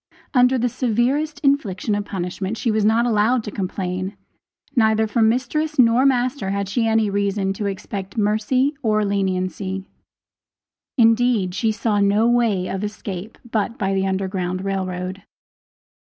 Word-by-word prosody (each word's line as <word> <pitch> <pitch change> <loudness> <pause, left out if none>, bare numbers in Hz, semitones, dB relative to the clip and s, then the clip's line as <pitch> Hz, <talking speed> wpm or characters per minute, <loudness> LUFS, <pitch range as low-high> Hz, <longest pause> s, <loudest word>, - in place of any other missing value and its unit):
Under 250 0 +4
the 245 0 +1
severest 260 +6 0
infliction 225 -8 +1
of 205 0 -1
punishment 190 +2 -4
she 230 - 0
was 215 -1 +1
not 225 +3 +3
allowed 230 +1 +2
to 210 - -6
complain. 185 0 -3 0.6
Neither 220 -2 +3
from 220 0 +2
mistress 305 +6 -1
nor 250 +1 +5
master 255 -4 0
had 200 0 -1
she 225 +3 0
any 220 -1 +2
reason 200 -1 0
to 205 +1 -3
expect 195 +1 -6
mercy 220 +7 +1
or 215 -2 +1
leniency 190 -1 -2 1.1
indeed 230 -5 +3
she 220 +4 +1
saw 210 -1 0
no 205 +3 +3
way 230 -6 +2
of 195 +1 -3
escape 205 -1 -6
but 220 +1 -1
by 195 -2 -1
the 195 0 +1
Underground 190 -1 -2
Rail 195 -1 -1
Road. 185 +1 -5
210 Hz, 145 wpm, -21 LUFS, 195-235 Hz, 1.1 s, nor